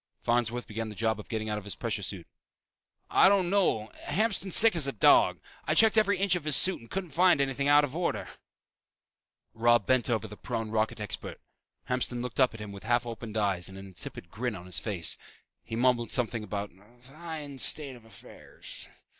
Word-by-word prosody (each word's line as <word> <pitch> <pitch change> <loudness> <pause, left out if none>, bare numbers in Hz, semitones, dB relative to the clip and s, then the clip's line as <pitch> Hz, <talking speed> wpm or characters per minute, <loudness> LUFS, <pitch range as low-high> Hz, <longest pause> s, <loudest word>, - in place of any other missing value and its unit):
Farnsworth 120 0 0
began 110 +1 -5
the 105 - -9
job 110 0 -1
of 105 - -11
getting 110 -1 -3
out 105 -1 -2
of - - -13
his 100 - -6
pressure 110 -3 -3
suit. 95 -3 -4 0.9
"I - - +6
don't 190 -3 +2
know. 145 - +1 0.2
Hamston's 195 +1 +1
sick 225 -3 +7
as 155 -5 +2
a - - -1
dog. 110 - +4 0.3
I - - 0
checked 220 -1 +6
every 205 -3 +3
inch 195 -1 +2
of 180 -4 -1
his 155 -2 0
suit 190 +1 +5
and 115 - -16
couldn't 185 -4 -5
find 175 +1 +4
anything 140 0 -1
out 145 0 +6
of 145 0 -4
order." 175 0 -2 1.3
Robb 120 -1 +3
bent 130 -1 +2
over 110 -2 -1
the 105 - -10
prone 115 -1 -5
rocket 110 0 -1
expert. 105 -1 -6 0.5
Hamston 125 -1 -2
looked 125 0 -6
up 130 -3 +3
at 110 - -9
him 105 -1 -7
with 100 -1 -10
half 120 +2 +1
opened 115 -1 -7
eyes 95 -4 -1
and 95 - -11
an 95 - -9
insipid 85 -2 -6
grin 120 0 -3
on 90 -2 -10
his 90 - -3
face. 95 -7 -1 0.4
He 115 - -6
mumbled 120 -1 +1
something 120 -3 -1
about 100 0 -5
"a 105 +6 -23
fine 145 +2 -9
state 140 0 +3
of 120 - -16
affairs." 110 -5 -12
120 Hz, 205 wpm, -28 LUFS, 105-145 Hz, 1.3 s, sick